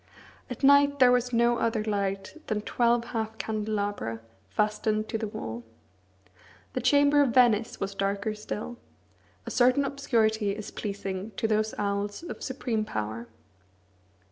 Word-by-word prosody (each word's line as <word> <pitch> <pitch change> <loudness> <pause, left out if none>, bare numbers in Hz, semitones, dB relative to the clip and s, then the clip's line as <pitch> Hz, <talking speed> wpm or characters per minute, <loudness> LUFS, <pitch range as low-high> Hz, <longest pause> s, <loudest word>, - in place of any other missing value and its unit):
At 250 - -7
night 285 +1 +6
there 255 -2 +6
was 250 0 +2
no 235 0 +3
other 225 -2 0
light 195 -2 -2
than 210 -1 -1
twelve 235 0 +2
half 220 -1 -3
candelabra, 205 - -2 0.3
fastened 215 - 0
to 225 - -2
the 220 - -2
wall. 120 - -6 1.1
The 255 - -2
chamber 285 0 +5
of 260 -4 +1
Venice 235 -3 +4
was 195 0 -3
darker 200 +2 -1
still. 215 +3 -6 0.7
A - - -5
certain 255 +3 +4
obscurity 220 -7 +1
is 215 -1 -7
pleasing 200 0 -5
to 225 - +1
those 215 0 0
owls 205 +5 -2
of 345 - -7
supreme 245 -4 -2
power. 110 - -4
220 Hz, 140 wpm, -28 LUFS, 205-245 Hz, 1.1 s, night